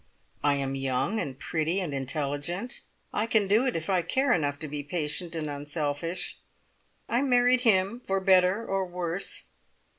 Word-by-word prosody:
I 145 -1 +4
am 135 -1 -2
young 135 - 0
and 135 -8 -4
pretty 160 +4 -1
and 175 -7 -3
intelligent 145 - -3 0.3
I 215 +2 0
can 220 -3 +2
do 220 +7 +4
it 250 - 0
if 160 -1 -3
I 185 -2 +2
care 265 +11 +2
enough 145 -4 0
to 155 - -4
be 145 0 -4
patient 155 +2 -3
and 155 -2 -2
unselfish. 145 +3 -3 0.7
I 240 +2 +1
married 250 -2 +4
him 210 0 +3
for 195 0 0
better 190 +3 +4
or 195 -2 0
worse. 180 +1 -2
175 Hz, 160 wpm, -28 LUFS, 145-200 Hz, 0.7 s, I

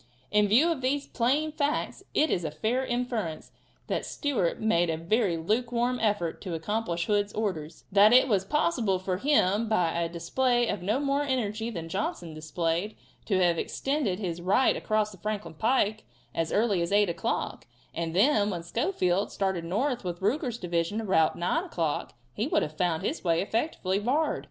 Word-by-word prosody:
In 210 0 +4
view 265 +12 +4
of 305 -5 -2
these 275 +2 0
plain 280 +6 0
facts 295 -1 -1
it 310 - +3
is 175 - 0
a 155 - -1
fair 225 - -1
inference 240 -10 -3 0.3
that - - -2
Stewart 250 - -1
made 175 -6 +2
a 160 - 0
very 180 +1 +1
lukewarm 240 +7 0
effort 205 -7 0
to 180 -4 -4
accomplish 175 0 -2
Hood's 205 -1 +1
orders; 170 -8 -3
that 205 +2 +6
it 255 +2 +6
was 200 -6 +2
possible 235 - +1
for 185 0 -2
him, 220 -4 +2
by 180 -7 +2
a 170 0 -1
display 240 +9 +1
of 205 - -2
no 210 +8 0
more 280 0 +1
energy 230 -5 -1
than 170 -7 -5
Johnson 175 -2 -3
displayed, 165 +5 -2 0.3
to 195 - +1
have 170 -2 +2
extended 270 -9 -1
his 175 -4 -4
right 200 +9 +3
across 215 -1 0
the 190 - -14
Franklin 210 0 -4
pike 215 +2 +1 0.3
as 165 -1 -1
early 205 -4 +2
as 170 - -2
8 205 0 +4
o'clock, 170 -7 -3 0.3
and 165 0 -3
then 210 0 +4
when 175 -4 -4
Schofield 195 - 0
started 190 -3 -1
north 240 +9 -1
with 175 -1 -4
Ruger's 240 +3 0
division 175 +2 -1
about 185 -7 +2
9 320 - 0
o'clock, 165 - -2 0.2
he 220 - -1
would - - +2
have 155 - -5
found 175 0 0
the 305 - -2
way 165 -2 +2
effectually 200 - -1
barred. 285 +8 +1
205 Hz, 175 wpm, -28 LUFS, 175-245 Hz, 0.3 s, that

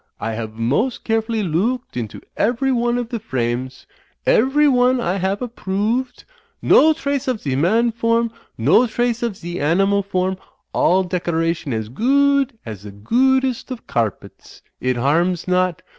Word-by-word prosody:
I 115 - -3
have 110 -1 -5
most 130 - -1
carefully 225 -1 0
loo 190 +9 +1
ooked 245 - -28
into 115 -4 -5
every 245 +5 +1
one 240 -1 +1
of 240 -2 -3
the 235 -2 -3
frames. 130 - -3 0.4
Every 280 +5 +4
one 250 -1 +3
I 195 -5 -1
have 195 +3 -1
approo 220 0 -1
ooved. 245 -1 -21 0.4
No 315 - +5
trace 280 -4 -3
of 255 -3 0
2e 135 -10 -3
Man 220 - +2
form. 230 0 +1 0.3
No 150 - +4
trace 240 +1 -1
of 230 -5 -2
ze 175 +1 -6
Animal 195 +7 +2
form. 185 -1 -1 0.4
All 185 +3 +3
decoration 165 -3 -1
as 110 -2 -2
goo 280 - +3
ood 270 -3 -3
as 110 -4 -7
the 105 - -9
goo 240 - +2
oodest 260 -2 -2
of 250 -3 -7
carpets; 115 -4 -4 0.2
it 130 -1 -1
harms 170 +8 +1
not. 180 -2 +1
200 Hz, 165 wpm, -20 LUFS, 155-245 Hz, 0.4 s, No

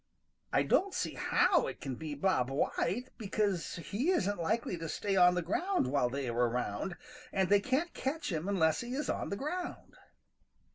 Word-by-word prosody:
I - - +3
don't 390 0 +2
see - - -1
how - - +3
it - - -6
can 135 - -4
be 150 +3 -5
Bob 140 -5 +1
White, 190 - -1
because 200 -4 -1
he 200 - -2
isn't 205 - +1
likely 190 +3 0
to 165 -1 -4
stay 200 +4 -1
on 180 -1 +6
the 180 - 0
ground 365 - 0
while 130 -2 +1
they 135 +1 -3
are 120 - -2
around, 120 - -2 0.3
and 190 -2 +1
they 205 0 +6
can't 265 - 0
catch 285 -2 -2
him 165 +3 -2
unless 160 -6 +2
he 245 +2 -4
is 295 - -1
on - - -3
the 200 - -3
ground." 350 - -4
190 Hz, 185 wpm, -32 LUFS, 155-245 Hz, 0.3 s, on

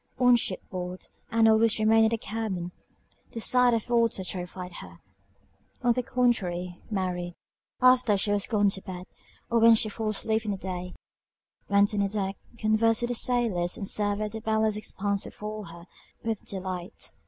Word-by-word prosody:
On 250 -1 +5
ship 200 -5 -2
board 180 0 -5 0.3
Ann 225 -1 +4
always 220 0 +4
remained 220 +1 +4
in - - +3
the 230 - -1
cabin; 200 -5 -4 0.6
the 230 - -4
sight 250 +1 +4
of 225 - -2
the 240 - -4
water 230 -4 +1
terrified 180 0 -5
her: 85 -1 -11 0.9
on 240 -1 +4
the 250 - 0
contrary, 180 -8 -1
Mary, 180 -4 -3 0.5
after 255 -4 +5
she 205 +1 0
was 205 -1 0
gone 205 -3 +2
to 195 0 -4
bed, 180 -1 -8 0.5
or 235 - +3
when 230 0 +7
she 215 0 +1
fell 215 +1 -3
asleep 220 +1 0
in 215 - -4
the 200 - -1
day, 180 -1 -6 0.7
went 200 +1 +3
on 200 -1 +1
deck, 195 -1 -2 0.2
conversed 225 +1 +2
with 240 - 0
the - - 0
sailors, 225 -8 +1
and 195 - -4
surveyed 205 +1 0
the 220 0 -6
boundless 220 -1 +1
expanse 200 -1 -2
before 210 0 -7
her 170 0 -11 0.4
with 225 -2 -3
delight. 185 0 -5
210 Hz, 175 wpm, -27 LUFS, 185-225 Hz, 0.9 s, when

